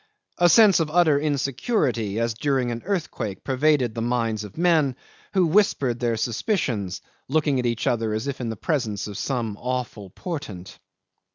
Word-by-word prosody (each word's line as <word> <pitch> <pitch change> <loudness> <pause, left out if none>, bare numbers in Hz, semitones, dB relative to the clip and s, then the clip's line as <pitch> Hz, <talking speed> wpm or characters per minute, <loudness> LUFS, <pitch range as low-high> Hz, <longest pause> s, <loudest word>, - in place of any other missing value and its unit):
A 175 0 +6
sense 205 +1 +6
of 160 -2 0
utter 155 -3 +4
insecurity 135 - 0
as 115 0 0
during 130 0 0
an 120 0 -4
earthquake 125 - -3
pervaded 135 -3 +2
the 115 - -4
minds 115 -2 -1
of 105 -2 -11
men, 160 -6 +3 0.4
who 185 -2 +4
whispered 155 - +2
their 120 -2 0
suspicions, 110 - -1 0.3
looking 145 -1 +1
at 125 - 0
each 115 -1 -2
other 115 -2 0
as 110 +3 -2
if 140 -2 -4
in 120 - -2
the 110 - -3
presence 115 -10 -1
of 105 - -7
some 115 -3 -2
awful 125 -5 -4
portent. 105 - -7
125 Hz, 165 wpm, -24 LUFS, 115-155 Hz, 0.4 s, A